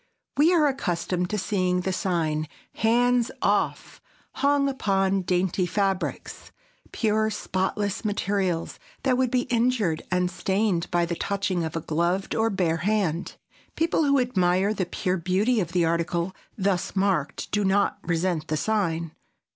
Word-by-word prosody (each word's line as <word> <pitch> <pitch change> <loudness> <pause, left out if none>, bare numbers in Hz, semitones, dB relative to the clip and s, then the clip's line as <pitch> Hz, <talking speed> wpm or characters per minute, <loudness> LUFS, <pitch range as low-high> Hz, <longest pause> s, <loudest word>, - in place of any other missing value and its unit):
We 305 +5 +5
are 330 -4 +4
accustomed 180 - -1
to 210 - -1
seeing 185 -2 0
the 190 +1 -2
sign 160 -5 -1 0.3
"Hands 240 +1 +2
off!" - - 0 0.3
hung 280 0 +2
upon 195 -7 +1
dainty 180 0 0
fabrics,—pure 215 - -2
spotless 200 0 -2
materials 195 -5 -1 0.2
that 260 -2 +3
would 255 0 +1
be 250 0 +2
injured 230 -9 +1
and 180 0 +1
stained 190 -1 0
by 175 -1 +2
the 170 - -3
touching 190 -1 -1
of 160 0 -4
a 165 - -1
gloved 170 +5 -1
or 225 0 +2
bare 180 -5 0
hand. 180 -2 -1 0.4
People 330 -1 +1
who 280 -1 +4
admire 195 -4 +2
the 185 -4 -2
pure 185 +1 -1
beauty 190 +8 +1
of 175 -4 -2
the 175 -1 +2
article 170 +2 -1 0.2
thus 190 -2 -1
marked 190 -7 0
do 210 0 +1
not 200 +1 +2
resent 165 -2 -1
the 155 - -1
sign. 170 -5 -1
190 Hz, 140 wpm, -25 LUFS, 175-215 Hz, 0.4 s, We